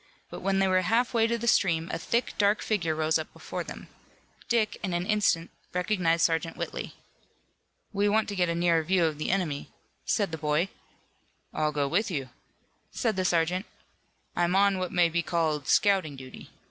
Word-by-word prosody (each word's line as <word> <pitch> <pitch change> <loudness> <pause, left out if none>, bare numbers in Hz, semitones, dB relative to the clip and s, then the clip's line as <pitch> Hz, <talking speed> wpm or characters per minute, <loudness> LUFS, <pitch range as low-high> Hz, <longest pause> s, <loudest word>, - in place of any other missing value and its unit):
But - - -6
when 195 0 0
they 195 0 +3
were 185 0 +3
half 230 +7 +1
way 225 -1 +3
to 235 0 0
the 235 - -5
stream 165 -7 +3
a - - -2
thick, 235 +1 -1
dark 205 +1 +3
figure 170 -7 0
rose 155 0 +1
up 160 - -6
before - - -5
them. - - -9 0.6
Dick, 230 -3 +1
in 185 -3 -2
an 175 +1 -1
instant, 205 -5 +1 0.2
recognized 180 -3 +2
Sergeant 165 0 -1
Whitley. - - -5 1.0
"We 205 +1 +2
want 220 +1 +2
to 205 - -4
get 180 -2 +1
a 170 - 0
nearer 170 -1 +3
view 175 +2 +2
of 155 -2 -2
the - - -2
enemy," 170 -7 -1 0.3
said 205 -5 0
the 160 - -5
boy. 155 +4 +1 0.8
"I'll 155 0 0
go 145 -2 0
with 200 +10 +1
you," 140 -7 -3 0.6
said 225 -5 -1
the 185 - 0
sergeant. 180 +2 +1 0.7
"I'm 175 +1 +1
on 200 -1 +4
what 185 -1 -3
may 175 -1 +4
be 170 +1 0
called 160 -4 -1
scouting 190 -8 +3
duty. 130 -1 -11
180 Hz, 185 wpm, -28 LUFS, 160-200 Hz, 1.0 s, on